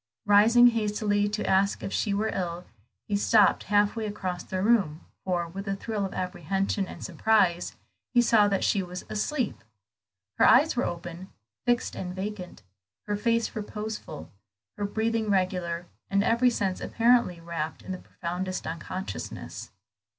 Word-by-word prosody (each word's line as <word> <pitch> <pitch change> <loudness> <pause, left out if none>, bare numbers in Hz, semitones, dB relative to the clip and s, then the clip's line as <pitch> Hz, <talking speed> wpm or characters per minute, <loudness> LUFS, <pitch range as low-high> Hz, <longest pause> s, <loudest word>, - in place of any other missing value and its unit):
Rising 225 +4 +7
hastily 210 -2 0
to 210 +1 -3
ask 195 +1 +2
if - - -4
she 210 - 0
were 210 +2 0
ill, 175 -1 -3 0.4
he 205 - 0
stopped 205 0 +4
half 205 +1 +3
way 220 -2 -2
across 185 -3 -4
the 185 0 -3
room, 195 -9 +2 0.2
for, 175 -2 -1
with 195 +4 -7
a 195 - 0
thrill 210 0 -3
of - - -11
apprehension 190 +2 -1
and - - -8
surprise, 185 -1 +2 0.4
he 245 - +4
saw 230 -3 +5
that 195 -1 0
she 200 - +2
was 180 0 -7
asleep. 245 +4 -2 0.8
Her - - +6
eyes 290 +5 +5
were 245 - +1
open, 175 +2 -6 0.4
fixed 240 -1 +1
and 180 0 -5
vacant, 190 - -6 0.4
her 210 - -1
face 230 +2 0
reposeful, 210 - -6 0.4
her 205 - -2
breathing 220 +1 -1
regular, 180 -3 0 0.2
and 200 0 +2
every 235 +3 +4
sense 195 -6 -1
apparently 235 -6 +2
wrapt 165 -2 -5
in - - -7
the 185 - -4
profoundest 185 +2 -5
unconsciousness. 170 +4 -6
200 Hz, 150 wpm, -27 LUFS, 180-220 Hz, 0.8 s, Rising